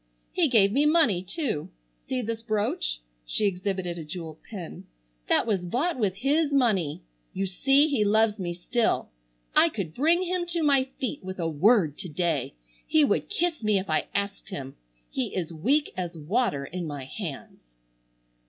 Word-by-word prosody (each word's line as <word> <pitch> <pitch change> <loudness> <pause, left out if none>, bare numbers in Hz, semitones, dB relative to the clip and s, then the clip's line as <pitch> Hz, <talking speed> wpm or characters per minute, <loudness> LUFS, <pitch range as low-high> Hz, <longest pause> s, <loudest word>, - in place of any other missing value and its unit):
He 345 -3 +3
gave 210 -7 +4
me 285 +6 +3
money 300 - +4
too. 195 - -2 0.4
See 255 -1 -1
this 225 0 -3
brooch?"—she - - -2
exhibited 185 -2 -2
a - - -5
jeweled 160 0 -7
pin—"that - - -3
was 205 -5 0
bought 255 - -1
with 200 -4 +1
his 285 +7 +1
money. 205 - +1 0.3
You 195 - -1
see 270 +10 +3
he 275 -8 +1
loves 215 +1 +3
me 175 -2 -2
still. 220 +7 0 0.5
I 335 - +6
could 195 - -5
bring 330 - +3
him 360 -1 -1
to 340 -1 0
my 275 -3 +4
feet 270 -3 -3
with 185 0 -6
a 170 -3 -1
word 165 - +3
to 180 - -6
day. 155 - -1 0.3
He 310 -2 +5
would - - 0
kiss 350 - 0
me 215 -2 +2
if 190 -3 -3
I 155 - +1
asked 200 0 -2
him. 135 -8 -6 0.3
He 125 - -3
is 170 -3 -3
weak 270 - +1
as 175 -2 -4
water 155 - 0
in 175 +2 -5
my 145 -3 -5
hands." 155 0 -7
200 Hz, 165 wpm, -27 LUFS, 165-260 Hz, 0.5 s, I